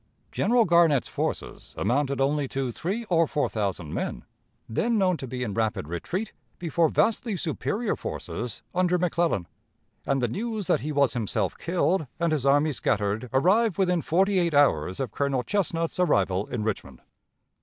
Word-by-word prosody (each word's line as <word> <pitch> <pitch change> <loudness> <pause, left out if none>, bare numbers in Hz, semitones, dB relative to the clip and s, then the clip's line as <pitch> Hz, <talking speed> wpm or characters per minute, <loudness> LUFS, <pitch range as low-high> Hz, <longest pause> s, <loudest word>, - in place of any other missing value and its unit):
General 235 +1 +3
Garnett's 170 -6 +4
forces - - -4
amounted 140 +1 0
only 140 +1 +1
to 135 -1 -2
three 200 - -3
or 165 -5 +3
four 145 - 0
thousand 95 -7 -3
men, - - -3 0.4
then 225 - 0
known 185 -3 +3
to 135 - -6
be 125 0 -4
in 105 -5 -3
rapid 110 -8 -1
retreat 175 - -4 0.2
before 165 -1 +1
vastly 225 +1 +1
superior 205 +8 -1
forces 120 -2 -5
under 180 0 +2
McClellan, 170 - 0 0.6
and 135 -1 +2
the 125 - +1
news 215 - -3
that - - +2
he 155 - -3
was 140 -3 +2
himself 115 -4 -1
killed 175 -2 0
and 170 -1 +1
his 140 -3 0
army 145 +3 +4
scattered 110 -2 -1
arrived 190 - +3
within 180 -3 +2
forty 190 +4 +2
eight 170 -4 +1
hours 95 - +3
of 135 - -2
Colonel 140 -3 0
Chesnut's 170 -3 -1
arrival 100 - +2
in 115 -3 -3
Richmond. 85 - -4
150 Hz, 160 wpm, -26 LUFS, 120-180 Hz, 0.6 s, Garnett's